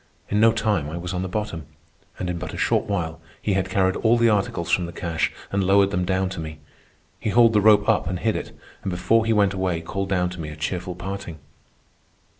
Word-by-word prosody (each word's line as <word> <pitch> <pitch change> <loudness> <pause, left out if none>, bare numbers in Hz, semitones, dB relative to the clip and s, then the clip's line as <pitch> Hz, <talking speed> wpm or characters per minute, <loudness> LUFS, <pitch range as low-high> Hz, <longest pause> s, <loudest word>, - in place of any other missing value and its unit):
In 105 - +1
no 115 +1 +6
time 105 -9 0
I 80 - -5
was 90 +1 -5
on 90 - -2
the 95 - -2
bottom. 90 -6 -4 0.5
And 90 - -3
in 90 -1 -3
but 90 - -6
a - - -7
short - - +1
while 85 -6 -3 0.2
he 105 - -1
had 95 0 0
carried 95 -1 +2
all 115 +1 +3
the 115 0 +4
articles 95 -4 -1
from 90 -2 +2
the - - -7
cache 85 -1 -1 0.2
and 100 0 +1
lowered 100 +1 +4
them 90 -2 0
down 95 +1 +1
to 95 -2 -6
me. 80 -1 -6 0.6
He - - -2
hauled 115 +1 +5
the 105 - +4
rope 105 0 +5
up 110 -7 +2
and 90 +1 -2
hid 110 +4 0
it, - - -5 0.3
and 100 - -3
before 95 +6 +2
he - - +2
went 100 -2 +3
away 95 -3 -1
called 95 +4 -4
down 90 -2 +1
to 90 -2 -7
me 75 - -5
a 75 - -8
cheerful 90 +3 -3
parting. 95 -2 -6
95 Hz, 235 wpm, -23 LUFS, 90-105 Hz, 0.6 s, no